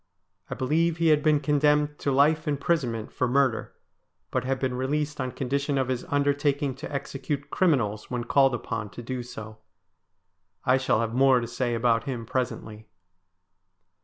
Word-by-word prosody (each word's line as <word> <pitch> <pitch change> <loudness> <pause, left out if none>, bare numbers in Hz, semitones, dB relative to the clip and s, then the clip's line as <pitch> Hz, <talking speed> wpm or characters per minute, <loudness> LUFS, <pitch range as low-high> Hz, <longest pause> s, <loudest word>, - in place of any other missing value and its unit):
I - - -4
believe 160 +5 +1
he 165 -1 +3
had 150 -1 +4
been 150 -1 +3
condemned 150 +1 +2
to 140 - 0
life 150 +4 +3
imprisonment 140 -6 -1
for 125 - 0
murder, 130 -2 +1 0.6
but 130 - 0
had 135 +1 0
been 130 0 -1
released 145 +3 -2
on 130 - -2
condition 140 +2 -1
of 130 -1 0
his 125 -1 -2
undertaking 145 0 +1
to - - -7
execute 140 0 -4
criminals 115 - +1
when 125 -1 -2
called 135 +1 +3
upon 115 -2 -4
to 120 - -6
do 125 +1 -4
so. 110 -2 -9 1.1
I 130 +1 +4
shall 130 -4 +1
have 115 0 -2
more 130 0 +5
to 120 - -3
say 120 0 -2
about 115 -1 +2
him 125 -4 -4
presently. 110 -3 -4
135 Hz, 160 wpm, -26 LUFS, 120-145 Hz, 1.1 s, more